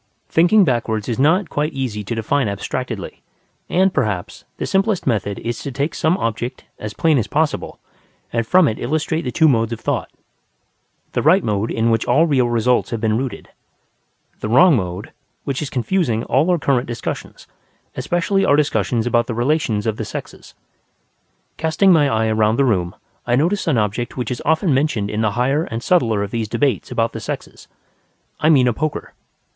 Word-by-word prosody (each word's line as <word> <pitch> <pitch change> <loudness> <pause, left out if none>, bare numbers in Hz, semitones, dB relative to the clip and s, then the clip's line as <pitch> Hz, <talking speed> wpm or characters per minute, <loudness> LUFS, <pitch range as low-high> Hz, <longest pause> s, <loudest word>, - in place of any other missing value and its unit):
Thinking 185 +6 +5
backwards 115 - -1
is 120 0 -2
not 170 +7 +3
quite 150 +2 -1
easy 125 -6 -3
to 115 - -3
define 120 +3 0
abstractedly; 110 +2 -5 0.5
and, 190 +1 +2
perhaps, 105 -10 -2
the - - -3
simplest 195 0 0
method 100 -5 -1
is 120 0 -4
to 140 - -5
take 140 +5 -2
some 160 +4 +1
object, 120 - -3
as 105 -1 -6
plain 160 -4 +3
as 110 - -2
possible, 155 0 -1 0.6
and 115 -1 -1
from 180 +2 +5
it 110 - -2
illustrate 160 +4 -1
the 125 - -4
two 160 +3 +4
modes 115 -5 +2
of 115 - -4
thought: - - -2 1.0
the - - -1
right 180 +6 +4
mode 105 +1 -1
in 115 +1 +1
which 115 0 +1
all 160 +3 +4
real 130 -6 +2
results 120 +1 +1
have 115 - -3
been 110 -1 +1
rooted; 130 +2 -4 0.9
the 105 - -4
wrong 165 +7 +6
mode, 95 -2 -4 0.3
which 140 -1 -3
is 150 - -3
confusing 125 - 0
all 145 +8 +1
our 180 - +3
current 135 -4 0
discussions, 120 - -6 0.5
especially 190 +3 0
our 145 - +4
discussions 125 -5 0
about 120 -1 +1
the 115 - -3
relations 120 -4 0
of 110 -1 -1
the - - -3
sexes. - - -8 1.0
Casting 160 +4 +3
my 150 -4 +4
eye 110 -1 +1
round 110 +1 +2
the 140 - +3
room, 90 -8 0 0.3
I 120 - +3
notice 170 +10 0
an 150 -7 +2
object 105 +4 -2
which 125 0 -3
is 125 - -4
often 160 +1 +2
mentioned 130 -7 0
in 105 - -1
the 110 -2 +1
higher 135 +7 +1
and 115 0 -5
subtler 115 - +2
of 100 - -5
these 115 -2 -2
debates 135 -6 0
about 115 0 -1
the - - -5
sexes: - - -7 0.7
I 155 - +3
mean 135 -5 +5
a 120 - +2
poker. 155 +5 -4
125 Hz, 185 wpm, -19 LUFS, 110-155 Hz, 1.0 s, wrong